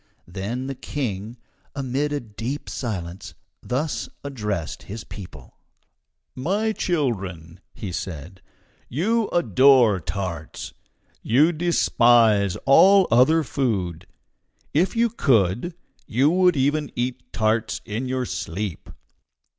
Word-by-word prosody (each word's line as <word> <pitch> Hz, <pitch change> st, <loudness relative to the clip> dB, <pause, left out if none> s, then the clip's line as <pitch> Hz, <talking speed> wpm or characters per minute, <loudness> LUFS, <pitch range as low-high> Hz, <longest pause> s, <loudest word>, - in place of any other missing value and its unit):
Thence 100 Hz, +8 st, -4 dB
the 135 Hz, -, -3 dB
King, 120 Hz, -5 st, -4 dB, 0.4 s
amid 140 Hz, +2 st, -1 dB
a 145 Hz, -, -1 dB
deep 115 Hz, +5 st, -6 dB
silence, 90 Hz, -, -5 dB, 0.3 s
thus 140 Hz, +5 st, -2 dB
addressed 105 Hz, -, -4 dB
his 110 Hz, +3 st, -8 dB
people: 75 Hz, -, -11 dB, 0.7 s
"My 200 Hz, +12 st, 0 dB
children," 95 Hz, -, -2 dB, 0.3 s
said 90 Hz, 0 st, -6 dB, 0.5 s
he, -, -, -11 dB
"you 220 Hz, +6 st, +2 dB
adore 130 Hz, -, +4 dB
tarts. 85 Hz, -3 st, -5 dB, 0.5 s
You 145 Hz, +9 st, +4 dB
despise 120 Hz, -, +3 dB
all 190 Hz, +7 st, +6 dB
other 155 Hz, +7 st, +5 dB
food. 100 Hz, -, -2 dB, 0.7 s
If 175 Hz, +9 st, +2 dB
you 235 Hz, +1 st, +3 dB
could, 125 Hz, -, +1 dB, 0.3 s
you 135 Hz, +7 st, +3 dB
would 180 Hz, -2 st, +3 dB
even 145 Hz, +2 st, +1 dB
eat 125 Hz, +1 st, -3 dB
tarts 110 Hz, +1 st, 0 dB
in 115 Hz, +5 st, -3 dB
your 130 Hz, 0 st, -1 dB
sleep. 100 Hz, -7 st, -5 dB
120 Hz, 105 wpm, -23 LUFS, 100-145 Hz, 0.7 s, all